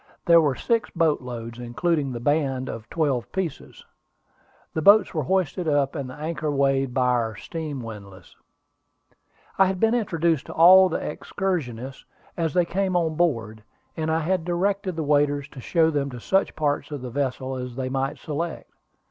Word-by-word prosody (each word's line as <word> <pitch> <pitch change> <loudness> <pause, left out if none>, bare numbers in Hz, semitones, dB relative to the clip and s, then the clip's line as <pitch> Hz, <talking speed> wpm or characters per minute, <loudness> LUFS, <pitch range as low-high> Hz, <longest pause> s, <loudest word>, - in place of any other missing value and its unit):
There 170 -1 +7
were 145 -4 +1
six 230 - 0
boat 165 -4 +1
loads, 120 -1 -7
including 140 +4 -1
the 120 - -5
band 135 -1 0
of 110 0 -7
twelve 140 -7 -1
pieces. 185 -6 -5 0.9
The 160 - -1
boats 200 +5 +6
were 155 - 0
hoisted 180 0 0
up, 145 -2 +2
and 140 -5 -5
the 130 - -9
anchor 155 0 -3
weighed 135 -2 +1
by 130 0 +1
our 115 -3 0
steam 145 +4 -6
windlass. 100 -4 -11 1.2
I 195 - +6
had 190 -1 -2
been 225 +3 +3
introduced 170 - 0
to - - -7
all 185 +3 +8
the - - -1
excursionists 135 - -4 0.3
as 165 -4 -2
they 180 -1 +4
came 190 +1 -1
on 165 -2 +1
board, 115 -10 -1 0.3
and 160 0 -2
I 160 +1 +1
had 180 +2 0
directed 185 +2 -1
the 160 - -2
waiters 145 -1 +1
to 135 - -11
show 160 +4 +2
them 140 -2 -1
to 125 -2 -8
such 195 - +1
parts 145 -2 -1
of 145 -4 -6
the 125 - -6
vessel 130 0 -2
as 125 -1 -6
they 130 0 -3
might 135 +1 -2
select. 160 +3 -5
150 Hz, 175 wpm, -24 LUFS, 130-170 Hz, 1.2 s, all